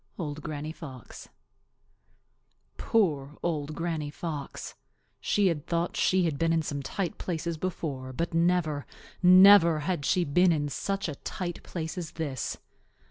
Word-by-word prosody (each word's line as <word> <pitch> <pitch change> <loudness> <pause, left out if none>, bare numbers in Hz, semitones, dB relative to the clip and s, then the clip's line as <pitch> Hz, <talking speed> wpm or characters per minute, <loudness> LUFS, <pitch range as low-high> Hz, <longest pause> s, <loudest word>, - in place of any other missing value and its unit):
—Old 155 -3 -4
Granny 155 0 -5
Fox. 135 -7 -10 1.5
Poor 150 -10 0
Old 155 -3 -2
Granny 165 -3 -2
Fox! 150 -2 -6 0.5
She 205 - +1
had 165 -6 0
thought 170 0 0
that - - -4
she 185 -1 +3
had 155 -4 -1
been 165 0 +2
in 165 -1 +2 0.2
tight 175 +7 -3
places 170 -1 -3
before, 150 -6 -4
but 165 +6 -3
never, 165 -4 +1 0.3
never 185 -3 +8
had 170 -2 -2
she 180 +5 +2
been 175 +4 +4
in 145 -2 0
such 195 +7 -2
a 155 - -3
tight 175 +4 -5
place 165 +1 -5
as 165 -3 -6
this. 145 -6 -3
165 Hz, 140 wpm, -28 LUFS, 145-180 Hz, 1.5 s, never